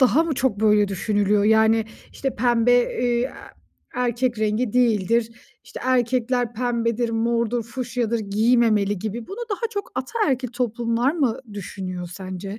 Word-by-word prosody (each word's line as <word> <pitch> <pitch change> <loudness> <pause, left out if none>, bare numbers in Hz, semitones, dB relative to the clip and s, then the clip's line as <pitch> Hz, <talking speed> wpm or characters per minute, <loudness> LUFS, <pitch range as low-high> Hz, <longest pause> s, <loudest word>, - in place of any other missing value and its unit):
daha 265 +4 +5
mı 330 -3 -2
çok 255 -6 0
böyle 210 -1 +4
düşünülüyor, 205 +1 +1
yani, 220 +1 +4 0.3
işte, 270 -1 -3
pembe, 240 0 +3 0.3
eee, 245 +1 0 0.6
erkek 245 -1 0
rengi 215 +1 0
değildir. 230 -1 +2 0.3
İşte, - - -9
erkekler 245 -1 +1
pembedir, 235 0 -1
mordur, 235 +1 0
fuşyadır; 235 -1 -2
giymemeli 215 -1 +2
gibi 220 +3 -5
bunu 395 - -8
daha 455 +3 -1
çok 405 -2 -5
ataerkil 260 - -1
toplumlar 240 +2 0
mı 275 -9 0 0.2
düşünüyor 185 -3 -6
sence? 190 +2 -7
235 Hz, 130 wpm, -23 LUFS, 215-250 Hz, 0.6 s, daha